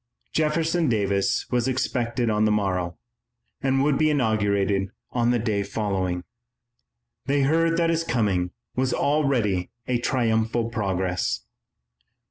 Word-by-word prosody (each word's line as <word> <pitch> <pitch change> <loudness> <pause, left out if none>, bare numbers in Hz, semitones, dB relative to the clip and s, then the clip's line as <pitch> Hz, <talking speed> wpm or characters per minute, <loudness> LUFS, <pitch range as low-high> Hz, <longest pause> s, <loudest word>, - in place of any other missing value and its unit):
Jefferson 160 +1 +1
Davis 100 -3 +1
was 125 -1 +1
expected 125 -2 -1
on 105 -1 +2
the 105 - +3
morrow, 90 -5 -1 0.6
and 135 0 +2
would 145 -1 +2
be 155 0 +4
inaugurated 100 -7 +1 0.2
on 120 -1 +1
the 120 - +3
day 110 -3 0
following. 95 -3 -2 1.0
They 140 0 +2
heard 165 +3 +2
that 170 -1 +2
his 165 0 0
coming 100 - 0 0.3
was 130 0 +1
already 125 -11 +1 0.2
a 125 -1 0
triumphal 115 -2 0
progress. 95 -5 -1
115 Hz, 120 wpm, -25 LUFS, 100-135 Hz, 1.0 s, be